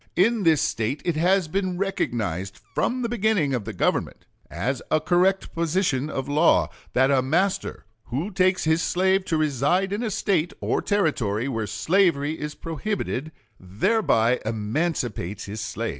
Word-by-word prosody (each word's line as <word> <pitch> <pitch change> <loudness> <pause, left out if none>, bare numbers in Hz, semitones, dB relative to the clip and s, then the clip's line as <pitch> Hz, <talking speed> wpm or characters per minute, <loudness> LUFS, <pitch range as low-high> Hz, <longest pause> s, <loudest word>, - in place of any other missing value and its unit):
In 225 +4 +3
this 165 -5 +3
State 115 +6 -2
it 175 -3 0
has 180 +2 +2
been 185 +1 -2
recognized 105 - -2
from 250 +1 0
the - - 0
beginning 215 - +1
of 120 -6 -2
the - - -4
government, - - -1 0.2
as 120 - -2
a 155 - +3
correct 180 +4 +1
position 165 -4 0
in 135 -3 -3
law, 150 +4 +3 0.2
that 130 +2 +3
a 135 -2 +4
master 170 - -1 0.2
who 150 - -3
takes 185 0 +2
his 160 +1 +2
slave 190 +2 +1
to 160 - 0
reside 155 +6 +1
in 210 - -2
a 235 - -1
State 180 -4 0
or - - 0
Territory 130 - 0
where 115 -5 -2
slavery 155 - +1
is 150 0 -5
prohibited 165 -3 -3 0.3
thereby 115 - +1
emancipates 110 - -2
his 105 +2 -6
slave. 110 +1 -3
155 Hz, 155 wpm, -24 LUFS, 120-190 Hz, 0.3 s, a